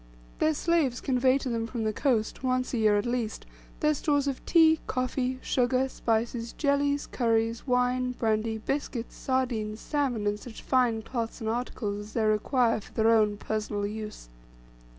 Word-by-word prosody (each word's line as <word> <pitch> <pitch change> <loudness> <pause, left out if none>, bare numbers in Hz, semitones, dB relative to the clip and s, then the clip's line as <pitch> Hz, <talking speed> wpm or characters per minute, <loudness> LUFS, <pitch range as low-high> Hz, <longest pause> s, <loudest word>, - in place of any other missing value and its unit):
Their 310 0 +2
slaves 305 -7 +1
convey 255 0 +2
to 275 - -5
them 230 -1 -1
from 230 -1 -3
the 215 0 0
coast, 230 -4 0
once 255 0 0
a 240 - 0
year 215 -1 +4
at 205 - 0
least, 240 -3 -2 0.4
their 305 -1 +4
stores 285 -1 +1
of 275 -2 -3
tea, 320 -2 +5
coffee 255 0 -1
sugar, 255 +1 +1
spices, 230 0 -1
jellies, 285 0 +1
curries, 230 0 0
wine, 250 0 +1
brandy, 220 -1 0
biscuits, 245 0 -3
sardines, 235 -5 -1
salmon, 265 -8 -1
and 205 0 0
such 225 0 -10
fine 245 -4 +2
cloths 230 0 -4
and 220 -2 -1
articles 225 -3 -3
as 210 +1 -9
they 225 - +1
require 220 +2 +2
for - - -16
their 225 0 +3
own 210 -2 +3
personal 210 -1 -2
use. 215 - -6
240 Hz, 165 wpm, -28 LUFS, 220-260 Hz, 0.4 s, tea